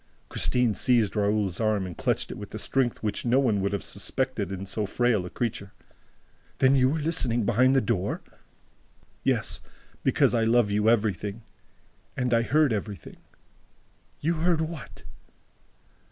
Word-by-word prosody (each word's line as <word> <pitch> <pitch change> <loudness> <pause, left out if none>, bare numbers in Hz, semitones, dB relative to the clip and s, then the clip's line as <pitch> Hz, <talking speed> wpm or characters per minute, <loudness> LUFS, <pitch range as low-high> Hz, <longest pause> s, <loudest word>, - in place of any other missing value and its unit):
'" - - -37
Christine 125 -3 +1
seized 115 -3 +2
Raoul's 100 -3 0
arm 110 -3 +1
and 90 -2 -7
clutched - - -1
it - - -7
with - - -9
a - - -3
strength 130 -4 -1
which 105 -1 -2
no 120 +2 +2
one 115 -7 +2
would 100 - 0
have 100 -4 -3
suspected 130 -8 0
in 95 0 -5
so 105 +1 -3
frail 115 -5 +1
a - - -8
creature. 100 -4 -4 0.8
"Then 130 0 +4
you 130 -1 +4
were 155 - -1
listening 130 -8 +1
behind 130 +6 +3
the 135 - +4
door?" 100 -3 -2 1.0
"Yes, - - -1 0.4
because - - +3
I 115 -2 +2
love 115 -2 +3
you 105 +2 +2
everything... 105 -1 0 0.7
And 125 -1 0
I 115 - +4
heard 145 +1 +2
everything 100 -5 -6 0.6
..." - - -38
"You 165 +3 +1
heard 165 0 +1
what?" 160 -3 -7
115 Hz, 160 wpm, -26 LUFS, 100-130 Hz, 1.0 s, Then